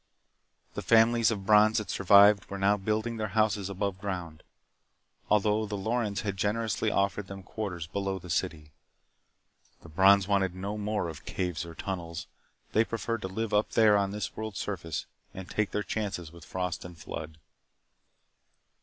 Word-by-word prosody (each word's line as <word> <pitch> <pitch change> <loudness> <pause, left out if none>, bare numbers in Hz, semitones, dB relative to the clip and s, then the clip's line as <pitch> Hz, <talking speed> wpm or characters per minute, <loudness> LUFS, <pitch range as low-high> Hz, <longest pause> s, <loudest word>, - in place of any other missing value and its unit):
The - - -4
families 115 0 +4
of 100 -4 -3
Brons 105 +1 +5
that 105 -4 -2
survived 100 +1 +6
were 100 - -4
now 100 +1 +3
building 110 +3 -2
their 110 -1 -2
houses 105 -3 +2
above 100 -1 -3
ground 90 -6 -5 0.9
although 105 +1 +2
the 105 0 -4
Lorens 110 0 -1
had 100 -3 -3
generously 110 +2 0
offered 100 0 0
them 95 -1 -8
quarters 90 -5 -5
below 100 +3 -3
the 90 - -11
city. 80 -4 -2 1.1
The 85 - -12
Brons 95 +4 +5
wanted 95 -3 +1
no 100 +3 -4
more 105 -2 -2
of 80 -3 -9
caves 90 -3 -3
or 85 - -10
tunnels. 85 -3 -5 0.5
They 110 - +4
preferred 115 0 -3
to 95 - -3
live 110 +3 -3
up 105 +1 +1
there 110 -2 +5
on 100 -1 +2
this 100 -3 -4
world's 110 -3 -5
surface 80 -7 -4 0.3
and 95 -1 -7
take 110 -1 -1
their 105 - -2
chances 100 -8 -3
with 85 -2 -13
frost 90 0 -3
and 90 -1 -10
flood. 80 0 -7
100 Hz, 165 wpm, -29 LUFS, 90-105 Hz, 1.1 s, survived